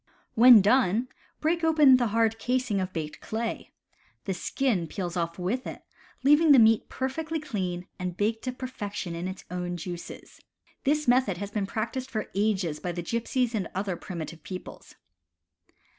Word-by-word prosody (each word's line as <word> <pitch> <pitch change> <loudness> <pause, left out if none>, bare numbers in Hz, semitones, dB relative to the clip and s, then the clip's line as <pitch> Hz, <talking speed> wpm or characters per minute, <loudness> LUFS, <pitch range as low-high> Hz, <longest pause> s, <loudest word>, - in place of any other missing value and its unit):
When 235 -3 +8
done, 235 +1 +3 0.3
break 335 +2 +1
open 305 -5 +6
the 240 -2 +1
hard 225 +1 +1
casing 250 -5 0
of 185 0 -3
baked 155 -4 -5
clay. 225 +1 -4 0.6
The 195 - -1
skin 190 -1 -1
peels 175 0 -4
off 170 -1 -2
with 205 +9 -2
it, - - -8 0.4
leaving 295 +2 +6
the - - +7
meat 225 -2 +5
per 260 - -2
fectly 320 +4 -3
clean 185 -11 -4
and 180 -1 -4
baked 220 +2 0
to 255 - -1
perfection 210 -8 -5
in 170 +2 -4
its 190 0 -7
own 180 0 -3
juices. 175 +1 -8 0.4
This 300 +1 +1
method 245 -7 +3
has 200 +2 -5
been 205 -2 -2
practiced 250 +5 -3
for 220 -4 -4
ages 195 -6 0
by 175 - -4
the 175 0 -4
gypsies 235 +4 -1
and 200 -6 -1
other 190 -1 -1
primitive 170 -2 -7
peoples. 185 +3 -9
215 Hz, 165 wpm, -27 LUFS, 180-255 Hz, 0.6 s, When